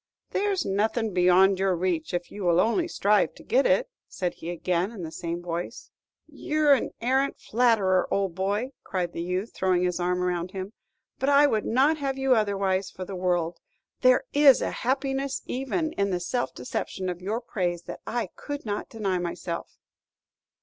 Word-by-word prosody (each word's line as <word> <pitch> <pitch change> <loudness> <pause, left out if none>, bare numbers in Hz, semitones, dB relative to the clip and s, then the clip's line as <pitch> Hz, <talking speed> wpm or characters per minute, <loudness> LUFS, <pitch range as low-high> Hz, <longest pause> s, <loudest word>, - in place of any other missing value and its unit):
"There's 395 -2 0
nothing 215 +2 0
beyond 185 +2 +5
your 190 -1 +2
reach 170 -2 -1
if 175 0 -3
you 205 - -6
will 175 -1 +3
only 235 - +2
strive 210 - +2
to - - -14
get - - +3
it," - - +3 0.2
said 180 -2 -3
he 165 - -8
again, 175 +2 -1
in 205 -6 -8
the 160 - -6
same 170 +1 -4
voice. 175 +5 -5 0.3
"You're 305 -2 +2
an 270 - +1
arrant 265 +3 +1
flatterer, 215 -6 +2
old 195 -3 0
boy," 200 +8 -1
cried 180 -2 -2
the - - -4
youth, 180 +5 -3
throwing 185 -1 +1
his 180 0 0
arm 180 +1 0
around 180 0 -2
him; 190 +2 -5 0.5
"but 270 - +1
I 285 +1 +6
would 220 -7 +1
not 275 +7 +3
have 275 -2 -2
you 270 -1 +3
otherwise 195 -3 +1
for 185 - -7
the 195 - -6
world. 175 -2 0 0.4
There 255 0 +5
is 285 -3 +7
a - - -1
happiness 270 +1 -1
even 270 +5 -2
in 200 0 0
the 180 -2 -1
self 240 +8 -2
deception 185 +8 -4
of 180 -1 -4
your 210 +5 -2
praise 175 -7 -2
that - - -8
I 240 -1 -2
could 285 -3 -6
not 205 -1 -3
deny 195 -5 -1
myself." 170 -1 -5
195 Hz, 180 wpm, -26 LUFS, 180-255 Hz, 0.5 s, is